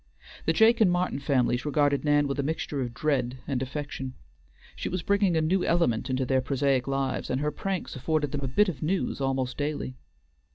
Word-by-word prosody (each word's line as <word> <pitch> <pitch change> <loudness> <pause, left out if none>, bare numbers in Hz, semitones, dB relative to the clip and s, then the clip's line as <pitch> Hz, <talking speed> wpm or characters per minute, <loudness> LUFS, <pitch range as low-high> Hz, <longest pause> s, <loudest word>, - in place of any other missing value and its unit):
The 165 - +4
Jake 225 +6 +5
and 190 -5 +6
Martin 175 -5 0
families 130 -3 +1
regarded 145 -1 +2
Nan 145 -1 +3
with 140 +1 -3
a - - +3
mixture 145 -1 -2
of 120 -2 -3
dread 130 -2 -1
and 130 -3 -1
affection. 135 -1 -5 0.6
She - - -4
was 180 -2 -3
bringing 200 -4 +2
a - - +3
new 180 +4 +1
element 135 -8 +1
into 130 0 0
their 130 0 +2
prosaic 135 0 +1
lives, 135 -1 -1
and 130 - 0
her 150 +1 0
pranks 190 +4 -3
afforded 150 +2 0
them 145 - -3
a 135 - -2
bit 210 +11 +3
of 155 -8 -4
news 175 -2 -1
almost 135 -1 -1
daily. 145 - -3
145 Hz, 200 wpm, -27 LUFS, 130-160 Hz, 0.6 s, and